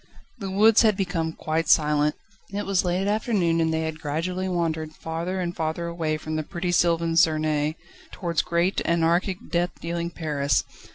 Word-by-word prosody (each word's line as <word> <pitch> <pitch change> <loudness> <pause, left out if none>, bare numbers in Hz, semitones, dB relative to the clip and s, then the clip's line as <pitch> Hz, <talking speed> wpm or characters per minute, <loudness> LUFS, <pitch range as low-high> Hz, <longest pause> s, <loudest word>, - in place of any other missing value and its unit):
The 195 -3 -4
woods 210 +3 +5
had 215 -4 +3
become 175 -4 -1
quite 160 +1 -2
silent. 150 -1 +3 0.4
It 205 +1 -3
was 195 -2 +1
late 180 +2 0
afternoon, 205 -6 +1
and 160 0 +1
they 160 0 0
had 160 -1 -4
gradually 180 +6 -2
wandered 160 -3 -1
farther 170 +3 -4
and 175 -1 -3
farther 160 +1 -2
away 165 -2 -2
from 155 0 -3
pretty 175 +1 -3
sylvan 170 -1 +2
Suresness, 155 -2 +2 0.4
towards 170 -3 -1
great, 170 +3 0
anarchic, 170 +3 +1
deathdealing 170 -1 -2
Paris. 145 -4 0
170 Hz, 155 wpm, -25 LUFS, 160-180 Hz, 0.4 s, woods